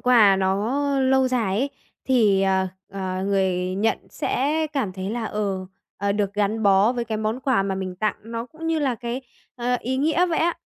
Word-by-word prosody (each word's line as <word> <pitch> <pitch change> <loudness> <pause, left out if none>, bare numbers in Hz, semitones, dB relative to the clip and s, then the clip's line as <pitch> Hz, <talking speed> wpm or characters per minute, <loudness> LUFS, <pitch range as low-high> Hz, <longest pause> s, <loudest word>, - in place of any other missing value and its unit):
quà 220 -6 +6
nó 200 +8 0 0.2
lâu 265 0 +3
dài 220 -6 0
ấy, 275 +4 0 0.3
thì, 215 -7 +3
ờ, 190 -1 +2 0.2
ờ, 190 -1 -3
người 185 -2 0
nhận 220 +3 +1
sẽ 310 +4 0
cảm 250 -10 -1
thấy 190 +2 -4
là, 235 -1 -3
ờ, 200 -3 -2 0.3
ờ, 200 0 0
được 205 -1 -1
gắn 210 +2 0
bó 200 +3 +5
với 240 -1 -2
cái 220 -2 -3
món 220 +4 -2
quà 255 -7 +2
mà 195 -1 -1
mình 185 -1 -4
tặng 215 +2 0
nó 230 +1 -5
cũng 320 +5 -8
như 325 -1 +1
là 270 -4 +1
cái, 240 +2 -5 0.3
ờ, 245 +1 0
ý 260 +2 -2
nghĩa 315 +6 +2
vậy 335 -2 0
á. 340 +1 +2
220 Hz, 200 wpm, -23 LUFS, 195-255 Hz, 0.3 s, quà